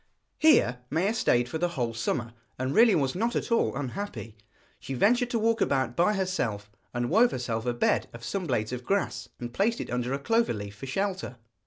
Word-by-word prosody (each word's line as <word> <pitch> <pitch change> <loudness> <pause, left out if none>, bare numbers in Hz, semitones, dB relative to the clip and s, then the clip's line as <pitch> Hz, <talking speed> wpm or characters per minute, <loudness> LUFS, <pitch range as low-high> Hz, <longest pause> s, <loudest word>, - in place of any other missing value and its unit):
Here 125 - +5
Maia 180 +8 +1
stayed 125 - +2
for 160 - -4
the 175 - +2
whole 120 -2 -1
summer, 115 0 -2 0.2
and 130 +2 -2
really 225 +1 +6
was 135 -4 +1
not 230 +6 -1
at - - -2
all 230 - +2
unhappy. 145 - -5 0.4
She 135 - -5
ventured 240 - +3
to 240 - 0
walk 225 0 +1
about 130 -3 +1
by 195 +5 +3
herself, 120 - -2 0.2
and 120 0 -1
wove 230 +6 +5
herself 120 - -3
a 120 - +1
bed - - +1
of 115 0 -11
some 190 +3 -3
blades 110 -5 -1
of 125 0 -5
grass, 125 -9 -1
and 120 -1 -6
placed 225 - +1
it - - -5
under 125 +1 -1
a 135 - 0
clover 225 - +1
leaf 100 -1 -7
for 120 +6 -8
shelter. 190 -3 -2
135 Hz, 205 wpm, -28 LUFS, 120-205 Hz, 0.4 s, really